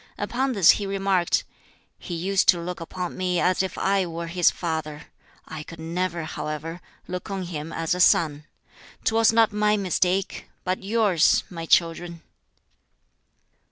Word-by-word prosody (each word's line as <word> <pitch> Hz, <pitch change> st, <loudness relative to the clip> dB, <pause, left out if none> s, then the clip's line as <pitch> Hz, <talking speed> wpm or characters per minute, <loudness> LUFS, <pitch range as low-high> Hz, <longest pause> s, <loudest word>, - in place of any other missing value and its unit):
Upon 250 Hz, +6 st, -1 dB
this 195 Hz, -7 st, +7 dB
he 205 Hz, -, -2 dB
remarked, 195 Hz, -2 st, +1 dB, 0.6 s
"He 175 Hz, -, -6 dB
used 190 Hz, +3 st, +1 dB
to 175 Hz, -, +6 dB
look 175 Hz, 0 st, -5 dB
upon 180 Hz, +1 st, -5 dB
me 180 Hz, -1 st, 0 dB
as 185 Hz, +1 st, +2 dB
if 190 Hz, -, -4 dB
I 195 Hz, -2 st, +1 dB
were 170 Hz, 0 st, -5 dB
his 175 Hz, +1 st, +3 dB
father. 160 Hz, -3 st, -4 dB, 0.4 s
I 155 Hz, -, -7 dB
could 165 Hz, +2 st, -11 dB
never, 170 Hz, +1 st, -2 dB
however, 155 Hz, +2 st, -5 dB, 0.3 s
look 180 Hz, +3 st, -6 dB
on 195 Hz, -1 st, -3 dB
him 165 Hz, -2 st, -6 dB
as 165 Hz, 0 st, -1 dB
a 180 Hz, -, -3 dB
son. 155 Hz, -4 st, +3 dB, 0.6 s
Twas 225 Hz, 0 st, +4 dB
not 225 Hz, -1 st, +3 dB
my 210 Hz, 0 st, +2 dB
mistake, 185 Hz, 0 st, -1 dB
but 185 Hz, 0 st, -2 dB
yours, 200 Hz, -5 st, +3 dB
my 165 Hz, -2 st, -6 dB
children." 170 Hz, 0 st, +1 dB
180 Hz, 150 wpm, -24 LUFS, 165-195 Hz, 0.6 s, this